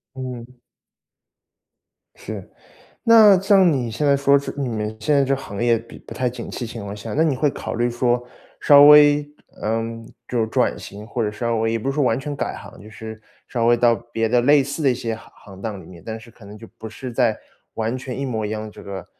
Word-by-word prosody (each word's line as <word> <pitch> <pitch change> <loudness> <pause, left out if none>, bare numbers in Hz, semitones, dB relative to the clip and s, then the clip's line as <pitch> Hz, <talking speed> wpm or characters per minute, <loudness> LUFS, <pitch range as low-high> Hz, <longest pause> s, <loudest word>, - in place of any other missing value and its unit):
嗯。 125 -1 -8 1.6
是。 - - -8 0.5
那 220 -4 +7
像 195 -3 +5
你 125 -5 -2
现 130 +7 -2
在 140 - +4
说 140 0 +4
是 140 - -6
你 135 -3 -2
们 110 -1 -3
现 145 +7 +1
在 140 -1 +4
这 135 +1 +1
行 110 -5 -6
业 120 -1 +3
毕 115 - -13
不 - - -12
太 125 -1 0
景 125 - -7
气 120 - -5
情 115 -1 -8
况 100 0 -6
下， 105 +1 -7
那 155 - +2
你 155 -4 +2
会 145 +3 +1
考 - - -6
虑 120 +1 0
说， 120 0 0 0.4
稍 145 -1 +7
微， 145 0 +7 0.4
嗯， 115 +1 -3 0.2
就 120 -2 -1
是 110 - +1
转 - - 0
型， 105 +2 -10
或 115 0 -3
者 105 - -1
稍 115 +1 -2
微 115 +1 0
也 115 - 0
不 135 +5 -2
是 - - -4
说 145 -2 +1
完 120 +1 +1
全 145 0 -5
改 - - -3
行， - - -12
就 105 - -12
是 110 +1 -9 0.3
稍 115 -2 -1
微 120 - +5
到 120 0 +4
别 115 -1 -3
的 120 +1 +3
类 145 +1 +5
似 140 +4 -5
的 135 - +4
一 - - +1
些 115 -2 -3
行 115 - -14
行 95 -2 -14
当 105 -4 -5
里 80 - -14
面， 85 -3 -13
但 110 0 -6
是 115 +1 -15
可 110 - -18
能 105 +1 -11
就 115 - -12
不 110 - -7
是 125 +3 -8
在 115 -3 +1 0.4
完 115 +2 -2
全 130 0 -6
一 140 - -2
模 110 -4 -3
一 - - -5
样 110 0 -5
这 - - -13
个 95 -2 -7
120 Hz, 255 characters per minute, -21 LUFS, 110-135 Hz, 1.6 s, 那